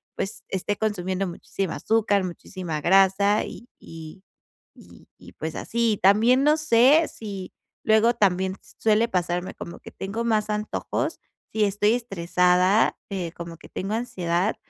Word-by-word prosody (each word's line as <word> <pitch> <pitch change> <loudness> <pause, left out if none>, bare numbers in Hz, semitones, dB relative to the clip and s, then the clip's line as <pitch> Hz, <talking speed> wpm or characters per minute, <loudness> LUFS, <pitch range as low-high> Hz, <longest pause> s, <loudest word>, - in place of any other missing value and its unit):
pues, 195 +3 -4
esté 195 +2 -2
consumiendo 195 -3 -1
muchísima 180 +1 -4
azúcar, 215 -3 +1
muchísima 175 -3 -6
grasa, 195 +4 +4
y 235 - -10
y 165 +3 -11 0.9
y - - -14
pues 160 0 -5
así. 230 -3 0
También, 225 +7 +5
no 300 +1 +5
sé 300 +2 +5
si, 200 -4 -7 0.3
luego 220 +2 +4
también, 190 -1 +1 0.2
suele 220 +1 +3
pasarme 180 -1 -2
como 170 - -9
que - - -11
tengo 200 +4 -4
más 215 -2 +1
antojos, 210 0 -3 0.3
si 220 - +1
estoy 205 +2 +2
estresada, 180 -2 +2
eh, 185 -4 -4
como 170 -1 -8
que - - -15
tengo 195 +3 -4
ansiedad, 185 -4 -1
195 Hz, 135 wpm, -24 LUFS, 180-220 Hz, 0.9 s, También